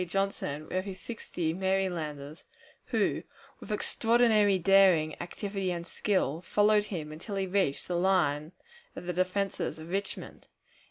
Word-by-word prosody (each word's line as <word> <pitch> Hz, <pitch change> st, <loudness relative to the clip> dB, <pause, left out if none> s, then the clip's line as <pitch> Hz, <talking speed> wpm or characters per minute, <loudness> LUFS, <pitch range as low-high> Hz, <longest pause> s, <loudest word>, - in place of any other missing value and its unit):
Johnson 175 Hz, -6 st, -2 dB
with 185 Hz, +1 st, -2 dB
his 190 Hz, -2 st, -6 dB
sixty 175 Hz, -8 st, -3 dB
Marylanders, 170 Hz, -6 st, -2 dB, 0.4 s
who, -, -, +1 dB, 0.4 s
with -, -, -9 dB
extraordinary 220 Hz, -2 st, +3 dB
daring, 185 Hz, -4 st, +5 dB
activity, 195 Hz, +2 st, -3 dB
and 170 Hz, -1 st, -4 dB
skill, 175 Hz, -5 st, 0 dB
followed 210 Hz, +3 st, +3 dB
him 160 Hz, -7 st, -5 dB
until 165 Hz, +7 st, -6 dB
he 195 Hz, -1 st, 0 dB
reached 185 Hz, -7 st, 0 dB
the 180 Hz, -, -1 dB
line 170 Hz, -4 st, +2 dB, 0.4 s
of -, -, -7 dB
the 180 Hz, -, -2 dB
defenses 185 Hz, +2 st, -1 dB
of 160 Hz, +2 st, -9 dB
Richmond. 195 Hz, +1 st, -4 dB
185 Hz, 130 wpm, -30 LUFS, 165-200 Hz, 0.4 s, daring